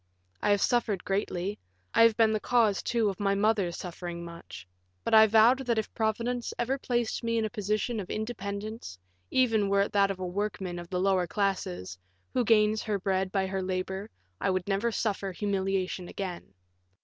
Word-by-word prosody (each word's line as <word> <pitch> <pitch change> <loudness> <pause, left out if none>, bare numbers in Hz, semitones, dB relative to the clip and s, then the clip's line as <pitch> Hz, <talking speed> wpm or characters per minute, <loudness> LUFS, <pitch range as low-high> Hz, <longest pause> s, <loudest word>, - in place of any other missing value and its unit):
I - - +1
have 205 -1 +3
suffered 225 -6 +1
greatly; 195 0 -2 0.3
I - - +4
have 230 -1 +6
been 220 -1 +4
the 215 - +1
cause, 225 -4 +2
too, 230 -3 +1
of 195 - -5
my 200 -1 +1
mother 205 -3 +2
suffering 175 -1 -6
much; 170 - -10 0.4
but - - -2
I 220 0 +9
vowed 225 +4 +5
that 235 -2 +2
if 220 - -2
Providence 235 +2 -1
ever 260 +3 -1
placed 240 -2 -1
me 230 0 0
in 225 - +1
a 215 - -4
position 215 +2 -1
of 190 - -6
independence, 215 - -5 0.3
even 225 -6 +2
were 200 0 +3
it 200 - 0
that 200 -1 +3
of 195 - -3
a 185 - -4
workman 190 -1 -3
of 175 0 -9
the 180 - -1
lower 185 -1 +2
classes, 95 - -2 0.3
who 250 - +2
gains 215 -1 +3
her 210 -2 -1
bread 190 -1 -1
by 195 -1 +1
her 190 0 -2
labor, 190 +2 -3 0.3
I - - 0
would 185 -1 -1
never 200 +4 +1
suffer 200 -3 -1
humiliation 190 -2 -1
again. 180 - -6
200 Hz, 185 wpm, -29 LUFS, 190-220 Hz, 0.4 s, I